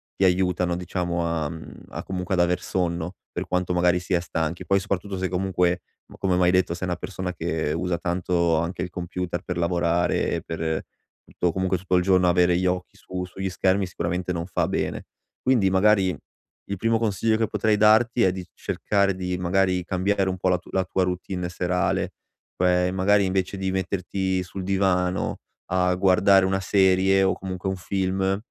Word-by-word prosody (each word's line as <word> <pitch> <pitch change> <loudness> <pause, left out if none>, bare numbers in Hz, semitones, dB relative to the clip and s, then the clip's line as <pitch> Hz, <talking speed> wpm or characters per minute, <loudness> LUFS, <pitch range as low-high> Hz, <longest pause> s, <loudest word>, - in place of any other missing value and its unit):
ti - - 0
aiutano 90 -1 +2
diciamo 90 -1 -2
a, 80 -3 -1
mhmm, 80 -1 -10
a - - -6
comunque 95 0 -2
ad 90 - +3
aver 90 0 +1
sonno, 85 -1 -2 0.2
per - - -4
quanto 90 0 0
magari 90 0 +3
si 90 +1 -4
è 90 - +4
stanchi. 85 -1 -3
Poi 100 0 +3
soprattutto 95 0 -3
se 95 0 -1
comunque 90 -1 0 0.3
m - - -11
come 95 -2 +1
m'hai 90 -1 +4
detto 95 -2 +2
sei 90 +1 -4
una 90 - -1
persona 90 +1 -5
che 80 -2 -2
usa 90 +1 -1
tanto 85 -1 0
anche 85 +2 -3
il 90 - -4
computer 90 0 -4
per 90 - -4
lavorare 85 0 +1
e - - -1
per 80 -1 -3 0.4
tutto 90 - -1
comunque 95 0 0
tutto 95 +1 -1
il 90 - +3
giorno 90 -1 +4
avere 90 0 +4
gli 95 - 0
occhi 90 0 -2
su 90 0 -5
sugli 95 +1 -4
schermi 95 +2 +1
sicuramente 90 +1 -3
non 85 0 -3
fa 95 - 0
bene. - - -2 0.4
Quindi 120 -7 +3
magari 95 -1 +3 0.5
il 100 - -2
primo 115 +2 +1
consiglio 110 0 +1
che 110 - +1
potrei 110 0 +1
darti 115 +3 +4
è 95 - +4
di 90 -1 -6
cercare 100 -2 0
di 90 -1 -3
magari 90 0 +1
cambiare 95 +1 0
un 95 - -3
po' 95 - 0
la 90 - +3
tu 90 - -16
la 95 - +1
tua 95 +1 0
routine 90 0 -3
serale, 90 0 -1 0.4
cioè 90 0 +2
magari 100 +2 +3
invece 95 +1 -1
di 95 0 -2
metterti 95 0 -1
sul 95 +1 -7
divano 95 -1 0 0.3
a 90 -1 +2
guardare 95 +1 +4
una 95 +1 +1
serie 95 0 +3
o 95 - +3
comunque 95 0 -4
un 95 - -2
film 95 +1 -1
90 Hz, 185 wpm, -24 LUFS, 90-95 Hz, 0.5 s, è